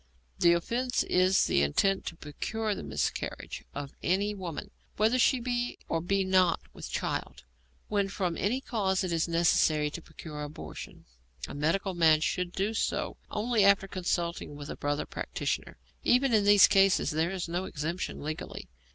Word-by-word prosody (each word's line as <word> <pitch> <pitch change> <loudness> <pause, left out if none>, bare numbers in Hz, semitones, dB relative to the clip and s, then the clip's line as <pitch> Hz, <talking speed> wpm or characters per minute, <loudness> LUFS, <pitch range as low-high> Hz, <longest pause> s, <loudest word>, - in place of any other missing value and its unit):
The 170 - +6
offence 240 +8 0
is 185 +1 +3
the 70 - +2
intent 190 - +1
to 170 - -4
procure 210 +8 -3
the - - -6
miscarriage 75 - -3
of 140 -1 -5
any 200 +3 +1
woman, 190 +1 -6 0.3
whether 225 +4 +3
she 255 +1 +4
be 245 0 -2
or 165 - -1
be 195 +3 +1
not 185 -2 +3
with - - -8
child. - - -3 0.4
When 200 -2 0
from 185 -4 -2
any 240 +10 0
causes 190 -7 0
it - - +1
is 165 - +1
necessary 160 -3 +3
to 170 - -6
procure 150 -2 -9
abortion, 150 +1 -8 0.4
a - - -8
medical 165 +7 0
man 160 -3 +5
should 175 +3 -1
do 200 +4 -1
so 225 - -1
only 220 0 +1
after 195 0 +5
consultation 175 -4 -2
with 145 0 -7
a - - -5
brother 145 0 -2
practitioner. - - -4 0.3
Even 250 0 +3
in 210 -2 +4
these 205 -1 +8
cases 195 -1 +4
there 160 +2 +1
is 185 -2 -3
no 175 +3 -2
exemption 165 +2 -4
legally. 155 +1 -6
185 Hz, 165 wpm, -29 LUFS, 165-205 Hz, 0.4 s, these